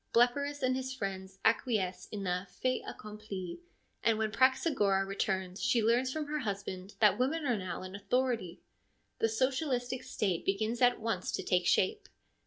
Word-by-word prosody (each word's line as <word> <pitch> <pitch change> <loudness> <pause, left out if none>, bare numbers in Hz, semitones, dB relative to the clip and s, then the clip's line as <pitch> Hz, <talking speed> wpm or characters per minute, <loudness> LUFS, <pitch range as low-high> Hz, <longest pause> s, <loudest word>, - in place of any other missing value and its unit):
Blepyrus 280 +4 +2
and 255 0 +3
his 260 0 -3
friends 190 -4 -5
acquiesce 220 -5 +1
in 205 -2 -5
the 180 +1 -1
fait 255 +7 -1
accompli, 210 - -7 0.4
and 225 -1 +3
when 220 -1 0
Praxagora 260 -6 +3
returns 190 -1 -2
she 235 -3 +3
learns 240 +4 +3
from 310 +1 -2
her 300 +1 -2
husband 195 -4 -4
that 210 -1 +5
women 295 +5 +1
are 245 -3 +2
now 185 0 -4
in 185 0 -8
authority. 225 -3 -1 0.6
The 225 - +3
socialistic 255 +1 0
State 190 -5 -1
begins 215 +5 0
at 245 0 +5
once 220 -5 -2
to - - -2
take 180 -1 +2
shape. 185 - +2
220 Hz, 160 wpm, -32 LUFS, 195-255 Hz, 0.6 s, that